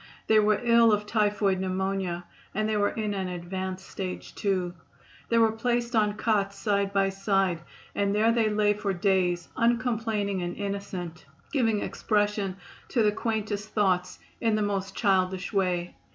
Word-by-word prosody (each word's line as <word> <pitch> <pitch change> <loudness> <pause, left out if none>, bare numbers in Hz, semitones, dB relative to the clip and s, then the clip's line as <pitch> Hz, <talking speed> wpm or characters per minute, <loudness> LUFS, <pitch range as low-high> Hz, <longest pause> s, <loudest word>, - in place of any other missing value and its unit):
They 220 0 +5
were 210 0 +3
ill 235 -1 +6
of 210 0 +1
typhoid 205 -3 +1
pneumonia 190 -2 -2 0.3
and 215 +1 +1
they 220 - 0
were 205 -1 +2
in 215 -2 -2
an 190 -2 -2
advanced 185 +1 -5
stage, 185 -2 -6
too. 185 -3 -1 0.6
They 230 - +3
were 225 -1 +5
placed 240 +1 -1
on 210 -1 +2
cots 200 -3 0
side 200 0 0
by 195 -1 +2
side 195 -3 +1 0.3
and 200 0 0
there 220 +2 +4
they 230 -2 +2
lay 210 0 +3
for 205 -1 -2
days, 180 -2 +1
uncomplaining 225 -5 0
and 175 0 -4
innocent, 195 -6 -5 0.3
giving 225 -7 +2
expression 205 -3 0 0.3
to 235 - +1
the 210 - +4
quaintest 215 -1 -2
thoughts 185 -3 +1 0.2
in 225 -3 +2
the 215 - +1
most 195 -1 -2
childish 190 -2 +1
way. 180 -3 0
200 Hz, 155 wpm, -27 LUFS, 190-215 Hz, 0.6 s, ill